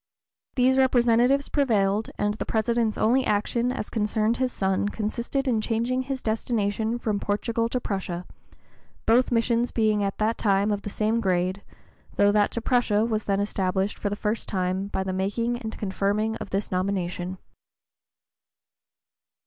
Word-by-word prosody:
These 260 +1 +3
representations 250 +1 +3
prevailed; 215 -7 +1
and 205 0 0
the 215 - -5
President's 225 0 +1
only 250 +4 +3
action 235 +3 0
as 210 - -5
concerned 215 +1 +1
his 255 -1 0
son 195 0 0
consisted 235 +6 -2
in 230 -4 +2
changing 235 +3 0
his 265 0 -4
destination 220 0 -1
from 215 -4 -1
Portugal 230 +3 -1
to 250 - -1
Prussia, 185 -5 -4 0.8
both 245 +4 +4
missions 235 +1 +2
being 215 -2 +1
at 195 -1 -2
that 220 +2 0
time 200 0 +2
of 205 -1 -1
the 205 - -5
same 215 +3 0
grade, 185 0 0 0.5
though 205 0 +4
that 205 0 +3
to 235 - -4
Prussia 225 -3 +2
was 220 -2 -1
then 200 -1 +1
established 195 -1 -1
for 205 - -1
the 205 - -2
first 210 +1 -2
time 185 0 -1
by 190 -1 -2
the 190 0 -3
making 230 +6 -1
and 220 -2 -6
confirming 205 +2 -1
of - - -7
this 195 +2 -2
nomination. 185 -1 -2
215 Hz, 155 wpm, -25 LUFS, 200-235 Hz, 0.8 s, both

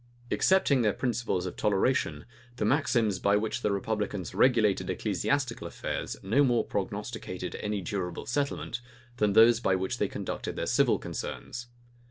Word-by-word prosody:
Excepting 170 -9 +3
their 105 -3 +2
principles 120 -7 -1
of 90 - -5
toleration, 105 +6 +1 0.3
the - - -1
maxims 120 -9 +2
by 100 +1 +3
which 110 +3 -2
the 105 - +1
republicans 100 -2 -2
regulated 110 -6 +3
ecclesiastical 130 -10 -1
affairs - - -4
no 110 +9 +3
more 120 -3 +3
prognosticated - - -4
any 105 -1 -2
durable 90 0 -4
settlement, 140 0 -2 0.4
than 105 -3 +2
those 115 +2 +7
by 95 -5 +2
which 95 0 -2
they - - +2
conducted - - -5
their - - -2
civil - - +3
concerns. 120 0 -6
110 Hz, 145 wpm, -29 LUFS, 100-125 Hz, 0.4 s, those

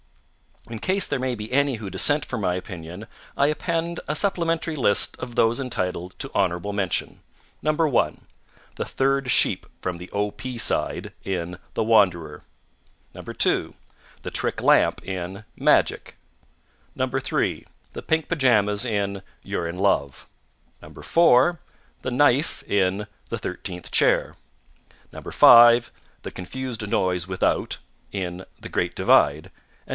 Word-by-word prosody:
In 115 -1 -7
case 190 - +1
there - - -2
may 130 -1 -1
be 110 0 -8
any 140 0 +2
who 110 -3 -7
dissent 145 +10 +2
from 120 -4 -4
my 90 -2 0
opinion, 90 +2 -8 0.3
I 140 - +3
append 165 +2 -2
a 150 - -1
supplementary 165 -4 0
list 120 -8 +2
of 120 - -7
those 115 +2 +2
entitled 90 -8 -4
to 135 - -5
honorable 95 +1 0
mention: 95 -4 -2 0.4
1. 155 -3 +1 0.5
The - - -3
third 135 -1 0
sheep - - +2
from 90 -2 -3
the 90 +1 -10
O. 105 0 -1
P. 130 +2 -7
side 115 - 0
in 90 -1 -4
The - - 0
Wanderer. 90 -9 +2 0.7
2. - - -1 0.5
The - - -5
trick - - -1
lamp - - +3
in 95 +2 -5
Magic. - - +1 0.8
3. - - -1 0.3
The - - -7
pink 160 0 0
pajamas 115 -8 +2
in 100 -4 -2 0.2
You're 85 - -3
in 85 +2 -6
Love. 80 -8 0 0.6
4. 170 0 +3 0.4
The 130 - -2
knife 145 +3 +2
in 100 +1 0 0.2
The - - -3
Thirteenth 90 -1 -6
Chair. - - +2 0.8
5. 120 0 +6 0.3
The - - -7
Confused 115 +3 -6
Noise 90 -3 0
Without 95 -1 0 0.3
in 90 -1 -5
The - - -9
Great - - -1
Divide. 75 +3 +3
6. 95 - -17
110 Hz, 130 wpm, -24 LUFS, 95-135 Hz, 0.8 s, 5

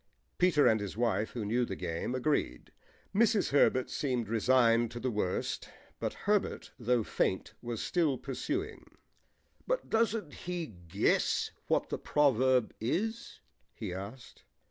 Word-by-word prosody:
Peter 175 -5 +4
and 110 -3 +5
his 100 0 -5
wife, 110 -3 0
who 115 -4 -3
knew 120 +4 +1
the - - -3
game, 85 +7 -3
agreed. 130 - -1 0.4
Mrs. 215 0 +3
Herbert 130 -2 +4
seemed 125 -6 -1
resigned 115 0 +4
to 120 - -7
the 130 +1 -1
worst, 105 -4 -2 0.3
but - - -2
Herbert, 210 -1 0
though 120 -1 +2
faint, 95 - -1
was 120 -2 -4
still 160 -7 +1
pursuing. 320 - -4 0.7
"But - - -1
doesn't 225 -7 +1
he 175 -1 -4
guess 90 - 0 0.2
what - - +1
the - - -3
proverb 130 -4 +3
is?" 220 - -2 0.3
he - - -5
asked. 100 +7 -9
125 Hz, 135 wpm, -31 LUFS, 110-170 Hz, 0.7 s, and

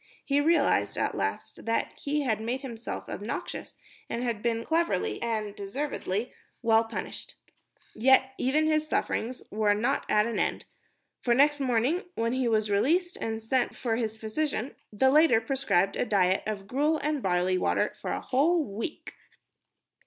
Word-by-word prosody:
He 280 +1 +2
realized 330 +3 +2
at - - 0
last - - -3
that 230 - 0
he 295 +1 -1
had 220 -6 0
made 245 +4 -2
himself 235 -4 -6
obnoxious - - -5 0.3
and 235 - -2
had 235 -4 -2
been 230 0 -1
cleverly 325 - 0
and 215 -3 -2
deservedly 210 0 -3 0.3
well 225 -1 +5
punished. 225 - -6 0.6
Even 220 - -8 0.6
yet 310 - +2
his 310 0 +1
sufferings 250 -4 -2
were 210 -1 +2
not 240 +7 0
at 210 0 +4
an 230 -2 -2
end, - - -1 0.6
for 240 -1 +2
next 290 +2 +4
morning, 260 +6 +1
when 230 +1 0
he 260 -1 0
was 215 -2 +1
released 340 - +2
and 225 0 -4
sent 250 +3 0
for 230 -3 -1
his 220 -2 -2
physician, 235 +3 -2 0.2
the 265 +6 +3
latter 305 -5 +6
prescribed 225 -6 +1
a - - +1
diet 195 -5 +2
of 205 -2 -4
gruel 295 +8 +1
and 300 -1 -1
barley 185 -1 +1
water - - +1
for - - -5
a - - -2
whole 315 +6 +2
week! 225 +5 -6
235 Hz, 160 wpm, -28 LUFS, 215-280 Hz, 0.6 s, latter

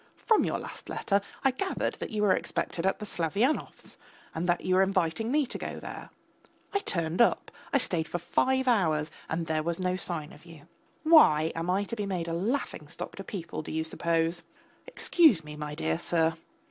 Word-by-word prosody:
From 445 -3 +3
your - - 0
last - - -8
letter 200 0 +1 0.2
I 270 - +4
gathered 380 +9 -2
that - - -4
you 210 -1 -1
were 190 -3 +5
expected 170 +2 -2
at 190 - +1
the 210 - -6
Slavyanovs', 200 - -1 0.4
that 175 +2 0
you 185 - 0
were 185 - +5
inviting 195 +3 +1
me 295 0 +3
to - - -7
go - - -5
there; - - -8 0.6
I 400 - +2
turned 170 - 0
up, 235 - +3 0.2
I - - +4
stayed 170 -10 0
for - - -2
five 260 +9 +1
hours 160 -10 +2 0.2
and 165 +1 -1
there 160 -1 0
was 170 +2 -2
no 185 0 0
sign 170 -5 -3
of 150 - -16
you. 165 -3 -14 0.4
Why, 165 - +6
am 165 +2 -3
I 190 +2 +2
to 230 - -5
be 205 -2 -3
made 180 -4 -2
a 165 - -2
laughing 215 +12 -2
stock - - -6
to - - -6
people, 180 -6 -5
do - - -8
you 160 0 -1
suppose? 165 +1 0 0.5
Excuse 320 - +4
me, 150 0 -9
my 150 0 -5
dear 80 - -1
sir 165 -1 +1
175 Hz, 200 wpm, -29 LUFS, 160-220 Hz, 0.6 s, Why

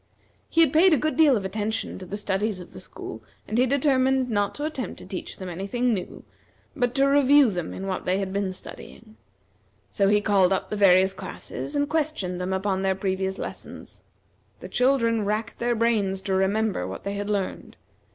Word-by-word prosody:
He 330 - +3
had 315 -5 +4
paid 340 +3 +6
a - - +5
good 310 +5 -1
deal 295 -6 +5
of 195 - -4
attention 215 +2 -3
to 185 - -9
the 205 - -4
studies 205 0 -1
of 180 - -12
the - - -9
school, - - -7 0.3
and 220 - 0
he 255 - +4
determined 265 -2 +2
not 205 -2 0
to 290 - -3
attempt 290 -5 -4
to - - -11
teach 190 - -6
them 185 - -7
any 180 +3 -5
thing 245 +2 +1
new, 185 -4 -5 0.5
but 245 -1 0
to 275 0 +4
review 280 -2 +5
them 175 -4 -4
in 195 - -6
what 190 -1 -3
they 185 +1 +1
had 195 -1 -3
been 200 -1 -1
studying; 215 +4 -11 0.8
so 200 - +2
he 205 +1 +4
called 200 -3 +3
up 190 - -1
the - - -1
various 190 -1 +5
classes, 285 - -7
and 285 0 +1
questioned 290 - -2
them 180 +1 -2
upon 190 0 -1
their 190 0 +1
previous 190 0 -2
lessons. - - -8 0.6
The - - -9
children 230 -4 +2
racked 215 +2 -2
their 240 0 +1
brains 215 -4 +1
to 190 0 -2
remember 195 - +1
what 95 - -7
they 200 - -3
had 205 +1 -4
learned. 200 -3 -3
210 Hz, 200 wpm, -25 LUFS, 190-255 Hz, 0.8 s, paid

